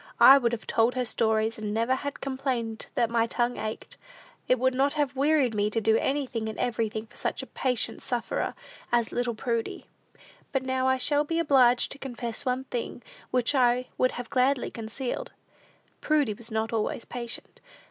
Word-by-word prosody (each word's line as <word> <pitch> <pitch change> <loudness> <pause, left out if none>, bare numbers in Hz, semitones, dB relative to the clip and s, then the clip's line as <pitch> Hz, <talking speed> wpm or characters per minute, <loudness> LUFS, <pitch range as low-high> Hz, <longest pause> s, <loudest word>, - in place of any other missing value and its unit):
I 275 +1 +10
would 235 -3 +1
have 235 -2 -4
told 230 +3 +2
her 250 -1 0
stories, 220 0 +1
and 210 -1 -3
never 230 +3 +2
have 285 +2 -4
complained 260 -5 -2
that 235 -4 +1
my 230 -1 +2
'tongue 240 +1 0
ached.' 215 0 -5 0.5
It 255 - +4
would 260 +1 +2
not 275 +2 +2
have 290 -3 0
wearied 280 -3 +3
me 205 0 +1
to 225 - 0
do 220 0 +3
anything 250 -4 -1
and 215 - -7
everything 225 -3 -1
for 235 - -18
such - - -2
a - - -6
patient 250 -4 -2
sufferer 240 -2 -2 0.4
as 235 -2 +2
little 245 -1 -1
Prudy!" 230 0 -2 0.7
But 270 -2 0
now 260 0 0
I 260 0 +3
shall 290 +3 +2
be 330 +2 -2
obliged 260 -6 +4
to 280 - -8
confess 240 -2 -5
one 255 +1 0
thing, 245 -2 -5 0.3
which 250 +2 +1
I 250 -1 +3
would 255 - +2
have 245 -1 -7
gladly 260 0 +2
concealed. 245 - -5 0.7
Prudy 295 -8 +2
was 225 +3 -10
not 220 0 -2
always 225 +1 -1
patient. 235 -1 -5
245 Hz, 180 wpm, -27 LUFS, 225-265 Hz, 0.7 s, I